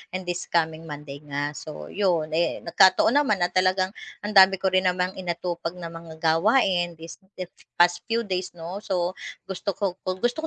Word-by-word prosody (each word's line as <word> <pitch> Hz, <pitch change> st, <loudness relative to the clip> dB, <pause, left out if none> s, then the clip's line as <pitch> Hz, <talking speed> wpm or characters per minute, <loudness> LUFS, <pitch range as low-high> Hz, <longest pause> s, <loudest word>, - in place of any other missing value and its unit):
and 185 Hz, -, -3 dB
this 175 Hz, 0 st, -4 dB
coming 160 Hz, -1 st, -1 dB
Monday 145 Hz, -2 st, -8 dB
nga 145 Hz, 0 st, -3 dB
so 150 Hz, +1 st, -9 dB
'yon, 175 Hz, -6 st, 0 dB
eh, 165 Hz, +2 st, 0 dB
nagkataon 190 Hz, +5 st, +5 dB
naman 215 Hz, -11 st, +1 dB
na 175 Hz, -, 0 dB
talagang 185 Hz, 0 st, +2 dB, 0.3 s
ang 210 Hz, -, -3 dB
dami 195 Hz, -1 st, +7 dB
ko 190 Hz, 0 st, -1 dB
rin 185 Hz, 0 st, +3 dB
namang 180 Hz, +1 st, -1 dB
inatupag 175 Hz, -1 st, -3 dB
na 170 Hz, -2 st, -7 dB
mga 165 Hz, -1 st, -10 dB
gawain 175 Hz, +1 st, +3 dB
this 165 Hz, +1 st, -11 dB, 0.2 s
if 185 Hz, -1 st, -7 dB, 0.2 s
past 175 Hz, 0 st, +4 dB
few 230 Hz, 0 st, 0 dB
days 185 Hz, -3 st, -3 dB
no, 175 Hz, +3 st, -6 dB
so 180 Hz, -4 st, -1 dB, 0.3 s
gusto 190 Hz, 0 st, -4 dB
ko 190 Hz, -2 st, -2 dB
gusto 215 Hz, +10 st, -1 dB
180 Hz, 180 wpm, -25 LUFS, 165-190 Hz, 0.3 s, dami